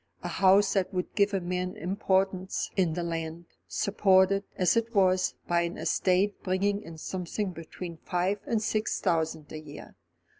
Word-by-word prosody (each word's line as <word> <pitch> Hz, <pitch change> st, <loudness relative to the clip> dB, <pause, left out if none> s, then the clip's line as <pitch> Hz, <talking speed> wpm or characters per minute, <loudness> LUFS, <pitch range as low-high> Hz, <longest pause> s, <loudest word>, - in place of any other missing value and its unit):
A -, -, -2 dB
house 195 Hz, +1 st, +4 dB
that 190 Hz, -2 st, 0 dB
would 180 Hz, -2 st, -3 dB
give 200 Hz, 0 st, +3 dB
a 195 Hz, -, 0 dB
man 180 Hz, +1 st, -3 dB
importance 190 Hz, +1 st, 0 dB
in 180 Hz, -5 st, +2 dB
the 175 Hz, +1 st, -2 dB
land, 165 Hz, 0 st, -4 dB, 0.2 s
supported, 195 Hz, -1 st, +3 dB
as 185 Hz, +2 st, +3 dB
it 230 Hz, 0 st, -1 dB
was, 185 Hz, -1 st, +3 dB
by 170 Hz, 0 st, +2 dB
an 170 Hz, +1 st, -3 dB
estate 190 Hz, +2 st, +1 dB
bringing 200 Hz, +2 st, 0 dB
in 165 Hz, -4 st, -10 dB
something 185 Hz, +4 st, -3 dB
between 165 Hz, 0 st, -8 dB
five 180 Hz, +4 st, -1 dB
and 225 Hz, -2 st, 0 dB
six 215 Hz, 0 st, 0 dB
thousand 160 Hz, -2 st, -1 dB
a 155 Hz, -, -6 dB
year. 150 Hz, -1 st, -11 dB
185 Hz, 160 wpm, -28 LUFS, 170-195 Hz, 0.2 s, house